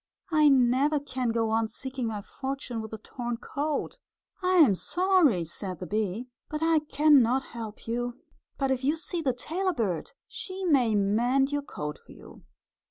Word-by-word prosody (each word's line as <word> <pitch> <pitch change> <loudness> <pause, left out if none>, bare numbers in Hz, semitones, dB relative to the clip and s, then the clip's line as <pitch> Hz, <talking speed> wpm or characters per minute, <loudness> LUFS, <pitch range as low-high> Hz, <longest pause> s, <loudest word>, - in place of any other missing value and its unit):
"I 305 -2 +5
never 270 +3 +3
can 260 -3 -3
go 225 -1 0
on 225 0 +2
seeking 260 +1 -4
my 215 -2 -3
fortune 265 -2 -5
with 220 - -8
a 220 - -5
torn 240 +2 -5
coat." 290 +4 -3 0.4
"I 370 0 +2
am 300 - +7
sorry," 345 - +2
said 180 +3 -5
the 185 - -5
bee, 215 +3 -2 0.2
"but 305 +1 -3
I 325 -1 +4
can 300 -1 +4
not 250 +3 +2
help 225 -2 -7
you. 240 +1 -2 0.4
But 270 -1 0
if 260 0 -1
you 290 +4 +2
see 330 +1 -3
the 275 -5 +1
tailor 355 +10 -2
bird 195 - -2
she 380 0 -6
may 255 -10 +3
mend 240 +7 +2
your 290 0 0
coat 150 - -6
for - - -15
you." - - -14
255 Hz, 175 wpm, -28 LUFS, 225-300 Hz, 0.4 s, am